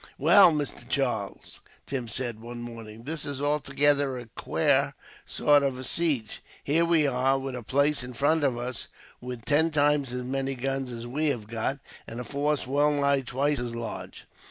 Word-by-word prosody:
"Well, 200 -4 +7
Mister 150 -3 -3
Charles," - - -2 0.3
Tim 130 -3 -4
said, 120 0 -4
one 120 +1 -8
morning, 115 -2 -9
"this 155 +2 -3
is 140 -2 -4
altogether 145 -1 +2
a 120 - -7
quare - - +1 0.3
sort 145 -1 +3
of 135 -2 -1
a 130 - -6
siege. 135 -8 -1 0.2
Here 160 +4 +2
we 165 -3 +3
are, 135 0 +2
with 135 -1 -4
a 125 - -5
place 140 +4 +2
in 125 0 -7
front 145 +5 +2
of 130 -4 +1
us 125 +1 -5 0.3
with 125 -2 -7
ten 155 +3 +3
times 145 -3 +2
as 125 0 -4
many 135 +1 -2
guns 135 +1 -2
as 115 0 -6
we 145 +6 -1
have 120 -7 -1
got, 115 +5 -2 0.3
and 115 - -7
a - - -3
force 145 +3 -1
well 145 +3 +2
nigh 140 -1 +2
twice 135 +3 0
as 120 -1 -4
large. 115 -1 -7
135 Hz, 180 wpm, -27 LUFS, 120-145 Hz, 0.3 s, Well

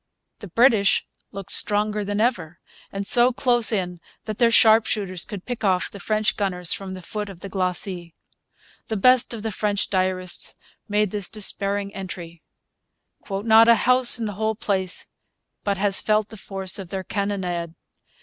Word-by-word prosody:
The 205 - -9
British 220 0 +3 0.3
looked 195 -1 -9
stronger 210 0 0
than 205 +1 -3
ever, 185 -9 -1 0.3
and 195 0 -4
so 245 +4 +6
close 240 -2 +3
in 180 -4 -2 0.2
that 215 -1 -6
their 235 - +5
sharpshooters 215 -5 +3
could 200 -3 -8
pick 245 -3 -5
off 185 -3 +1
the 200 - -10
French 215 +2 0
gunners 180 -4 0
from 190 -1 -6
the 185 - -10
foot 210 +3 -5
of 185 -2 -12
the 195 - -7
glacis. 185 -2 -3 0.8
The 220 - -2
best 255 +4 +4
of 225 -3 -5
the 220 - -2
French 205 0 -2
diarists 185 -1 -2 0.3
made 210 -1 +1
this 205 -3 -2
despairing 200 -1 -3
entry: 175 -3 -8 0.9
'Not 220 +3 +4
a 235 - +7
house 250 0 +6
in 230 - -3
the 210 - -4
whole 220 0 0
place 190 -3 -2 0.6
but 200 -1 -1
has 195 0 +2
felt 215 0 +1
the - - -10
force 195 -1 -5
of 190 -3 -8
their 190 0 -4
cannonade. 180 -4 -3
200 Hz, 165 wpm, -23 LUFS, 185-220 Hz, 0.9 s, a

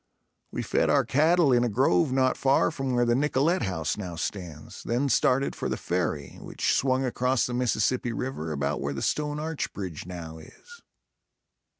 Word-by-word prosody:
We - - -3
fed - - +1
our - - +3
cattle 155 0 +3
in 120 0 +4
a 120 - +1
grove 95 +2 +2
not 130 -1 +2
far 135 +4 +2
from 135 -4 -2
where 120 0 +3
the 120 - +2
Nicollet 150 +6 +1
House 80 -3 -2
now 90 -4 -5
stands, 85 -3 -6
then 125 +4 0
started 130 +3 +2
for - - -3
the - - -2
ferry, 85 -5 -3
which - - -1
swung 130 0 +1
across 125 0 +1
the 120 - -4
Mississippi 125 0 0
River 115 -10 -4
about 70 -2 -2
where 70 +1 -3
the - - -4
stone 150 0 -1
arch 160 0 -3
bridge 90 -5 -6
now 80 -3 -7
is. 475 - -15
125 Hz, 180 wpm, -27 LUFS, 90-135 Hz, -, in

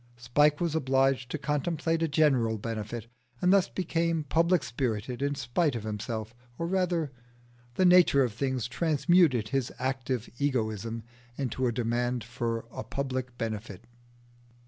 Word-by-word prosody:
Spike 145 +5 +3
was 170 -3 0
obliged 135 -3 +2
to - - -2
contemplate 155 +3 -1
a 165 - +2
general 135 -7 +2
benefit, 110 +1 -5 0.3
and 180 +1 +4
thus 195 -2 +4
became 165 -3 0
public 170 +3 +2
spirited 120 0 -3
in 140 0 0
spite 140 +2 0
of 115 - -4
himself. 110 +1 -4 0.2
Or 165 - -2
rather, 175 -4 0 0.6
the 185 - +3
nature 180 -6 +6
of 120 -4 -1
things 130 -1 -1
transmuted 155 - +3
his 135 -2 -1
active 130 -2 -2
egoism 115 -5 -1 0.3
into 130 -1 -1
a - - +1
demand 120 +1 -1
for 115 -1 -3
a - - -6
public 130 +1 -4
benefit. 110 -4 -5
130 Hz, 140 wpm, -29 LUFS, 115-155 Hz, 0.6 s, nature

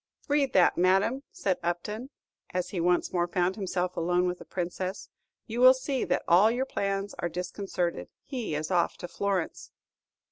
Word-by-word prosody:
"Read 285 -2 +2
that, 180 -2 +4
madame," 195 +8 +3
said 190 -2 -1
Upton, 210 +9 -3 0.5
as 180 - -1
he 180 - -2
once 175 +1 +1
more 175 -1 +1
found 180 +1 0
himself 180 -3 -2
alone 175 +2 +1
with 180 0 -2
the - - -11
Princess; 185 +1 -4 0.4
"you 235 +1 -3
will 255 +1 +9
see 260 0 -2
that - - 0
all 185 +6 +6
your 250 +3 0
plans 200 -4 -2
are 175 - -1
disconcerted. 180 0 -3
He 245 - -4
is 155 +4 -3
off 175 -2 +2
to 175 - -6
Florence." 195 -2 -2
185 Hz, 170 wpm, -28 LUFS, 175-215 Hz, 0.5 s, will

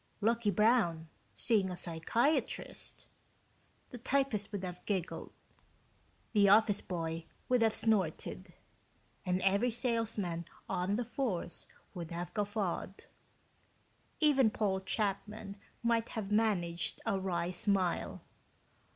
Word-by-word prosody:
"Lucky 230 +1 +2
Brown? 200 -6 +3 0.2
seeing 210 -5 +2
a 180 - -5
psychiatrist?" 205 - 0 0.9
The 245 - -7
typist 255 -5 0
would 200 -2 -4
have 180 -1 -6
giggled, 190 -4 -2 1.0
the 200 -2 +6
office 210 0 +5
boy 165 -2 -3 0.2
would 250 -1 +3
have 225 -1 +4
snorted, 190 - 0 0.8
and 180 +1 +1
every 200 +6 +3
salesman 225 -8 -1 0.2
on 185 +1 0
the 240 +2 -1
force 225 -8 -2 0.3
would 170 -4 -6
have 175 +1 -5
guffawed. 205 -2 -2 1.1
Even 275 -6 +5
Paul 200 -3 0
Chapman 200 +1 -2 0.3
might 230 -1 +2
have 205 -2 -3
managed 190 -6 +1
a 200 -4 +1
wry 175 -2 -1
smile. 185 -1 0
200 Hz, 110 wpm, -33 LUFS, 180-225 Hz, 1.1 s, the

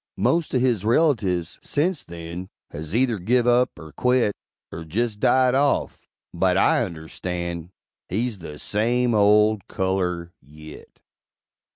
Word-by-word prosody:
Most 165 -4 +1
o' - - +5
his 120 -6 +1
relatives, 105 - +1
sence 160 +2 -1
then, 85 +2 -8 0.2
Has 80 +5 -6
either 120 -3 +2
give 120 +6 +2
up, 125 +1 +2
er 80 -2 -11
quit, 125 - +2 0.4
Er 80 - -6
jest 105 +6 -2
died 130 +3 +3
off; 140 +1 0 0.3
but 90 +1 +2
I 115 - +3
understand 85 -1 -5 0.4
He's 110 +2 -2
the 75 -3 -9
same 120 +7 0
old 105 0 +3
color 90 -3 -2
yit! 75 +2 -14
105 Hz, 130 wpm, -23 LUFS, 85-125 Hz, 0.4 s, o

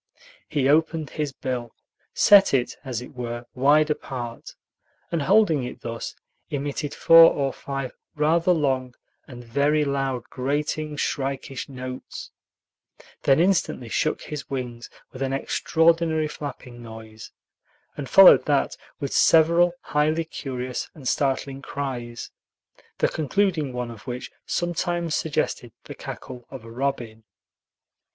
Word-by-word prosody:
He 145 -4 +1
opened 160 0 +2
his 150 -3 -2
bill, 125 -3 -5 0.4
set 200 -7 +6
it, 125 -2 0
as 125 -4 -4
it - - -12
were, 120 -1 -5
wide 150 +4 +4
apart, 120 -5 -6 0.6
and 165 -2 0
holding 180 -5 +3
it 125 - -7
thus, 115 0 -5 0.3
emitted 145 +1 -3
four 165 0 +8
or 135 -2 -1
five 135 -2 -5 0.2
rather 165 +4 +3
long 130 -6 0 0.3
and 120 -4 -10
very 145 +5 +1
loud 135 -3 -1
grating, 150 +4 -2
shrikish 135 -1 -3
notes; 130 -1 -8 0.9
then 135 +2 +4
instantly 170 -9 +1
shook 155 - 0
his 150 -2 -7
wings 125 -3 -5 0.2
with 130 - -10
an 135 0 -1
extraordinary 160 +2 +2
flapping 135 -5 -8
noise, 110 -1 -11 0.6
and 135 -3 -6
followed 195 +5 +9
that 145 -2 +1 0.2
with 140 -2 -3
several 170 +2 +5
highly 155 +2 0
curious 130 -5 -5
and 140 -5 -8
startling 135 0 0
cries, 125 -5 -5 0.7
the - - +3
concluding 160 -2 0
one 125 -1 -4
of 115 - -13
which 125 0 -5 0.2
sometimes 175 -1 -1
suggested 140 -6 -1
the - - -8
cackle 120 -1 -9
of 130 -4 -9
a 115 - -10
robin. 120 -3 -3
140 Hz, 125 wpm, -24 LUFS, 125-155 Hz, 0.9 s, followed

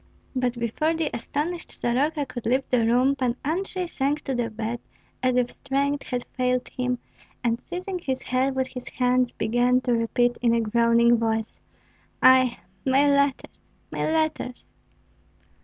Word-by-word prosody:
But 250 -1 0
before 240 +8 0
the 320 -2 -1
astonished 315 +8 -3
Soroka 285 +5 0
could 240 -4 -6
leave 260 +3 +2
the 245 -2 +3
room 255 +4 +3
Pan 250 -3 0
Andrei 365 +4 -1
sank 290 -2 -1
to 270 - -2
the 240 -2 -1
bed 225 +2 -4 0.4
as 255 -1 +2
if 250 -1 +1
strength 280 +1 -1
had 250 -1 -3
failed 250 -1 0
him, 250 0 -2 0.5
and 235 0 0
seizing 360 +1 -5
his 265 -6 -3
head 260 +1 0
with 260 -1 0
his 250 -1 -8
hands, 250 -1 +1
began 245 +3 +2
to 250 -1 0
repeat 240 +1 +1
in 235 -1 +3
a - - +2
groaning 235 +1 +4
voice, 220 -1 -2 0.6
"Ai! 255 -2 +6 0.3
my 270 +2 +4
letters, 280 -1 +1 0.3
my - - -2
letters!" 315 -6 -1
255 Hz, 155 wpm, -25 LUFS, 240-280 Hz, 0.6 s, Ai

